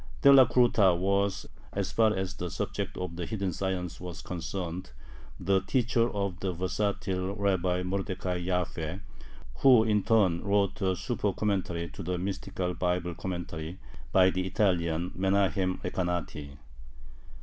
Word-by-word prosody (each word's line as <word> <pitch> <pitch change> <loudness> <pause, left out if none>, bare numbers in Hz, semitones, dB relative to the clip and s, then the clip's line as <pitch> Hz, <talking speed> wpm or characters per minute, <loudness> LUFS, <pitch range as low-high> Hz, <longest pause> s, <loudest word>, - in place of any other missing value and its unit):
Delacruta 120 -8 +6
was, 100 +1 0 0.3
as - - -2
far 110 -1 +4
as 95 0 -2
the 90 -1 -5
subject - - -4
of 90 -2 -5
the 85 - -3
"hidden 100 -4 -2
science" 95 -1 -3
was 90 -2 -7
concerned, 90 +2 -5 0.5
the 95 +1 +2
teacher 120 -1 +2
of 100 -4 -3
the 95 - -1
versatile 95 +1 -2
Rabbi 95 -3 +1
Mordecai 95 -1 -2
Jaffe, 90 -1 -2 0.6
who, 125 -5 +6
in 105 -2 +2
turn, 95 -6 +3
wrote 100 0 +1
a 95 -1 +2
supercommentary 90 -3 -1
to - - -7
the 90 +1 -2
mystical 90 -1 -3
Bible 90 -1 -1
commentary 85 -1 -5 0.3
by 95 0 +5
the 95 0 -2
Italian 90 -3 +1
Menahem 95 -1 +1
Recanati. 85 -6 -3
95 Hz, 125 wpm, -29 LUFS, 90-100 Hz, 0.6 s, Delacruta